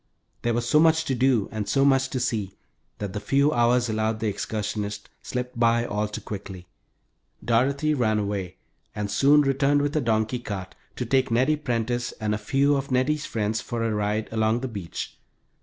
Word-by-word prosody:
There 120 -1 0
was 120 0 -1
so 150 - +4
much 160 0 +4
to 135 - 0
do 125 -4 +2
and 110 -2 -4
so 135 0 +3
much 135 -1 +3
to 130 - -2
see 105 -5 -2 0.4
that 100 -2 -5
the 105 - -3
few 140 +6 +2
hours 120 +1 +3
allowed 110 0 -1
the 110 - -2
excursionists 105 0 -4
slipped 125 -1 -5
by 115 0 +3
all 105 -1 -1
too 105 - -6
quickly. 95 -3 -7 0.8
Dorothy 140 +6 +2
ran 110 -6 +1
away 100 -3 -3 0.4
and 105 -1 -3
soon 145 +2 +5
returned 140 +1 +2
with 145 0 -1
her 155 - +1
donkey 110 0 0
cart, 100 -5 -6 0.2
to 125 - -3
take 130 +2 +2
Nettie 130 +6 +3
Prentice 120 -4 -2
and 105 -1 -2
a 105 - -2
few 140 +6 +2
of 135 0 -2
Nettie's 140 +4 +1
friends 110 0 -1
for 120 -1 -3
a 115 -1 0
ride 105 +1 -1
along 110 +1 +1
the 130 - -2
beach. 100 -8 -6
115 Hz, 190 wpm, -25 LUFS, 105-135 Hz, 0.8 s, soon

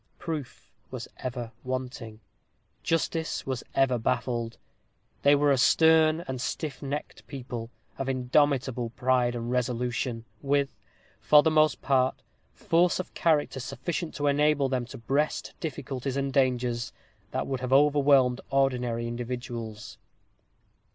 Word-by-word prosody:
Proof 155 -6 -6 0.2
was - - -6
ever 120 -2 -5
wanting; 130 -3 -5 0.6
justice 165 0 -1
was 130 -2 -3
ever 130 -3 +3
baffled. 120 -1 -1 0.6
They 145 +1 +6
were 145 0 +3
a 135 - +3
stern 160 +3 +5
and 130 -2 -4
stiff 145 +2 -4
necked 145 +1 -5
people, 125 -4 -6 0.3
of 135 0 -2
indomitable 130 -1 +1
pride 125 -1 +2
and 120 0 -4
resolution, 125 -1 -1 0.2
with, 140 0 +1 0.5
for 150 -1 +6
the 160 - +3
most 155 0 +3
part, 130 -2 +1 0.3
force 175 +2 +2
of 185 - -5
character 150 -4 +1
sufficient 155 +7 -4
to 145 - -2
enable 145 -1 +3
them 130 -2 -1
to 130 +3 -10
breast 140 +6 -1
difficulties 135 -3 -4
and 135 -1 -1
dangers 125 -3 +1 0.4
that - - -2
would 135 -2 -3
have 130 0 -4
overwhelmed 140 -2 +4
ordinary 125 -4 +1
individuals. 120 -2 -6
130 Hz, 125 wpm, -27 LUFS, 125-145 Hz, 0.6 s, They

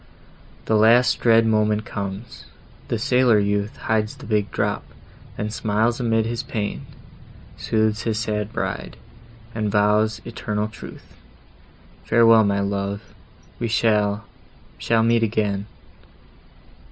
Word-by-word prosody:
The 110 - +1
last 115 +4 +4
dread 115 -1 +4
moment 110 -1 +1
comes!—The 100 +2 -7
sailor 125 -3 +3
youth 100 +1 -1
Hides 110 -1 -1
the - - -12
big 105 -2 0
drop, - - -2 0.5
then 105 0 -3
smiles 110 +3 0
amid 115 -2 +1
his 115 0 -3
pain, 105 -2 -4 0.7
Sooths 110 -1 0
his 110 -2 -2
sad 105 -1 -2
bride, - - -4 0.6
and 110 -2 -2
vows 105 +1 +2
eternal 105 -3 -3
truth, 110 - -12 0.9
"Farewell, 115 -1 +5
my 100 0 +1
love—we 100 +3 -6
shall—shall 110 +1 -1
meet 115 0 +3
again!" 105 -2 -1
110 Hz, 105 wpm, -22 LUFS, 105-115 Hz, 0.9 s, Farewell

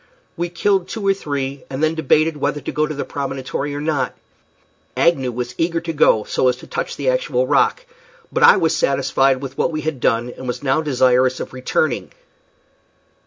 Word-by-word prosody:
We 175 0 -2
killed 185 +1 +1
two 205 +1 -5
or 195 - +4
three, 140 -6 -4
and 135 +3 -3
then 155 0 +2
debated 160 0 +2
whether 145 0 -1
to 140 - -5
go 155 0 0
to 155 - -4
the 145 - -3
promontory 135 +1 -4
or - - -3
not. 150 -3 -1 0.8
Agnew 135 -7 +2
was 125 +1 -4
eager 165 0 +1
to 165 -1 -4
go, 110 -7 +4
so 130 - 0
as 125 - +3
to 125 - -13
touch 480 +2 -4
the - - -1
actual - - 0
rock; - - +2 0.5
but 470 - -1
I 475 0 +8
was - - +1
satisfied 135 - +2
with 135 0 -7
what - - +1
we 155 -1 -3
had 155 -4 -3
done, 120 +1 0
and 130 - -8
was 125 +2 -4
now 135 +3 +2
desirous 130 -3 +2
of - - -6
returning. 130 +2 -1
145 Hz, 195 wpm, -20 LUFS, 130-170 Hz, 0.8 s, I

